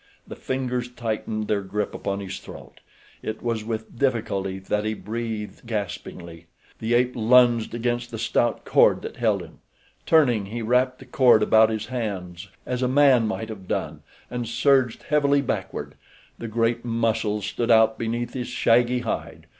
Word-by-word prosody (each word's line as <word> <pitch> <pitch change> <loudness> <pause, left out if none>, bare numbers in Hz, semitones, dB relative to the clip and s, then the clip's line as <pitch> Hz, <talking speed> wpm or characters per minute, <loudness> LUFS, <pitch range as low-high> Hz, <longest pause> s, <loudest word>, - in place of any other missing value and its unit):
The - - -8
fingers 125 -2 -3
tightened 110 -2 -3
their 105 -2 +1
grip 100 +2 -3
upon 100 0 -3
his 95 -2 -6
throat. - - -12 0.4
It 110 - -5
was 115 -2 -1
with 110 +1 -6
difficulty 100 -7 0
that 105 +2 -2
he 110 0 -2
breathed, 110 0 -5
gaspingly. 85 -6 -6 0.3
The 115 +1 0
ape 125 +1 +3
lunged 120 0 +4
against 120 0 -2
the 115 - -6
stout 115 +1 0
cord - - +4
that - - -7
held - - +1
him. - - -15 0.5
Turning, 125 -11 +4
he 115 +3 -5
wrapped 125 +3 +2
the 130 - -13
cord 125 -4 +4
about 110 +1 +5
his 110 -1 -3
hands, 100 -7 -5 0.2
as 125 0 -3
a 125 - +2
man 130 -3 +4
might 110 0 -4
have 100 -4 -9
done, - - -3 0.3
and 120 -2 -3
surged 130 0 +2
heavily 140 -1 +2
backward. - - -4 0.5
The 115 - -5
great 115 +1 0
muscles 115 -3 0
stood 120 0 -2
out 110 -1 +5
beneath 115 +1 -2
his 125 -2 -4
shaggy 125 0 +2
hide. 115 - -4
115 Hz, 160 wpm, -24 LUFS, 110-125 Hz, 0.5 s, about